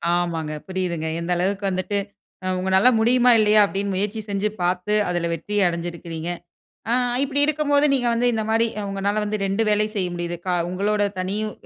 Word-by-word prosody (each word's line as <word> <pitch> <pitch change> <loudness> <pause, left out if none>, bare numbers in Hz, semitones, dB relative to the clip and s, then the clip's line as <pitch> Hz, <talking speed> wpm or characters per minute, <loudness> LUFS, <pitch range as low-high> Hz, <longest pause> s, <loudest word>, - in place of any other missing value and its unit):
ஆமாங்க. 165 -3 -2
புரியுதுங்க. 180 -4 -2
எந்த 170 +1 -3
அளவுக்கு 200 +3 -1
வந்துட்டு, 185 +2 -2 0.5
அ - - -3
உங்களால 190 +5 +4
முடியுமா? 245 +2 +4
இல்லையா? 215 0 +5
அப்டின்னு 200 0 -3
முயற்சி 205 +3 -1
செஞ்சு 200 +1 0
பார்த்து. 180 +3 0 0.2
அதுல 175 -1 -1
வெற்றி 170 +6 -5
அடைஞ்சிருக்கிறீங்க. 170 -1 -4 0.6
ஆ - - +2 0.3
இப்டி 280 +1 0
இருக்கும்போது 295 -1 +2
நீங்க 250 -3 0
வந்து 235 +1 +1
இந்த 220 -1 -1
மாரி 225 +1 +3 0.2
உங்களால 200 +2 -1
வந்து 210 +1 -2
2 195 +3 0
வேலையும் 210 +1 +1
செய்ய 185 -3 0
முடியுது. 175 0 -3
கா 180 - 0 0.2
உங்களோட 205 +3 0 0.2
தனியும் 205 +4 -2
195 Hz, 165 wpm, -22 LUFS, 175-215 Hz, 0.6 s, இல்லையா